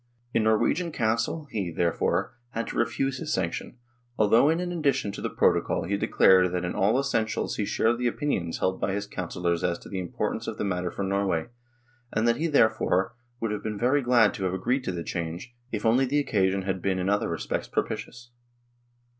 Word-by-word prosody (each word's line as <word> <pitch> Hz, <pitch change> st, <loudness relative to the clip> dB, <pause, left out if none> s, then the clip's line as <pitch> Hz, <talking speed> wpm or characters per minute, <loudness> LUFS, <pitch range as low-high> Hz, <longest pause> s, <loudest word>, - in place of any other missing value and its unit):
In 110 Hz, -, +2 dB
Norwegian 155 Hz, +10 st, +2 dB
Council 115 Hz, +6 st, 0 dB
he, 100 Hz, -6 st, -2 dB
therefore, 85 Hz, +7 st, 0 dB, 0.2 s
had 115 Hz, -, -2 dB
to -, -, -6 dB
refuse 135 Hz, +3 st, 0 dB
his -, -, -4 dB
sanction, -, -, -2 dB, 0.4 s
although 115 Hz, +7 st, +5 dB
in 165 Hz, +2 st, +2 dB
an 180 Hz, 0 st, -2 dB
addition 140 Hz, -10 st, 0 dB
to 100 Hz, -, -7 dB
the -, -, -2 dB
protocol 85 Hz, -, +2 dB
he 95 Hz, +5 st, -1 dB
declared 95 Hz, -2 st, +4 dB
that 90 Hz, 0 st, -1 dB
in 90 Hz, -, -2 dB
all 105 Hz, +6 st, +2 dB
essentials 120 Hz, -6 st, -1 dB
he 105 Hz, -, 0 dB
shared 115 Hz, +3 st, +1 dB
the 125 Hz, -, +1 dB
opinions 115 Hz, -, -1 dB
held 95 Hz, 0 st, -1 dB
by 95 Hz, -, 0 dB
his 100 Hz, +1 st, -2 dB
councillors 90 Hz, -3 st, -2 dB
as 85 Hz, -1 st, +1 dB
to -, -, -13 dB
the 95 Hz, -, -3 dB
importance 90 Hz, -2 st, -3 dB
of -, -, -4 dB
the -, -, -2 dB
matter 90 Hz, -3 st, -1 dB
for 100 Hz, -, -4 dB
Norway, 95 Hz, -2 st, 0 dB, 0.6 s
and 110 Hz, +2 st, +1 dB
that 115 Hz, -, +3 dB
he, 165 Hz, -, 0 dB
therefore, 110 Hz, -, +2 dB, 0.3 s
would 115 Hz, -2 st, -1 dB
have 105 Hz, -, -3 dB
been 105 Hz, -1 st, -4 dB
very 130 Hz, +6 st, +2 dB
glad 120 Hz, -4 st, +4 dB
to 95 Hz, -, -5 dB
have 95 Hz, 0 st, 0 dB
agreed 125 Hz, +8 st, 0 dB
to -, -, -1 dB
the 85 Hz, -2 st, -4 dB
change, 85 Hz, +9 st, -5 dB, 0.2 s
if 110 Hz, -1 st, -3 dB
only 120 Hz, +4 st, +4 dB
the 140 Hz, +3 st, 0 dB
occasion 95 Hz, -8 st, +1 dB
had 95 Hz, -1 st, -2 dB
been 95 Hz, 0 st, 0 dB
in 90 Hz, 0 st, -1 dB
other 100 Hz, +1 st, +1 dB
respects -, -, -3 dB
propitious. 120 Hz, 0 st, -4 dB
105 Hz, 205 wpm, -27 LUFS, 95-120 Hz, 0.6 s, although